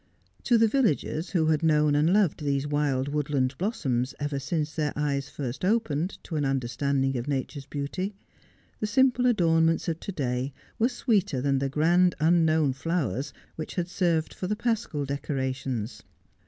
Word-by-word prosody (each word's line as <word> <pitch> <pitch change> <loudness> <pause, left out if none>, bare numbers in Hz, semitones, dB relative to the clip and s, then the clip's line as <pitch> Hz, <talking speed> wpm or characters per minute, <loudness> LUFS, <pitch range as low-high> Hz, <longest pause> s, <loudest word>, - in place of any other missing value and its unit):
To 240 - +5
the 225 0 +5
villagers, 190 - 0
who 165 -4 +1
had 155 -1 +2
known 150 -2 +3
and 150 +4 +3
loved 190 -6 +2
these 140 -1 0
wild 145 -2 0
woodland 145 -3 0
blossoms 135 - -1
ever 145 -1 -2
since 155 +1 -2
their 150 -2 -1
eyes 140 -2 -1
first 135 0 -5
opened 185 -5 0
to 160 - -4
an 145 - 0
understanding 135 +1 0
of 120 - -6
nature's 140 0 -3
beauty, 185 +8 -4 0.6
the 215 - -1
simple 250 +2 +3
adornments 165 -7 +3
of 165 -1 -1
to - - -5
day 130 -4 -2 0.3
were 235 +3 +3
sweeter 205 - +1
than 135 +1 +1
the 135 0 -1
grand 175 +5 +3
unknown 160 -3 +3
flowers 145 -2 -2 0.3
which 155 - -6
had 175 -2 -1
served 170 -4 0
for 185 - -4
the 210 - 0
paschal 225 -10 -1
decorations. 130 -4 -3
150 Hz, 160 wpm, -27 LUFS, 140-180 Hz, 0.6 s, To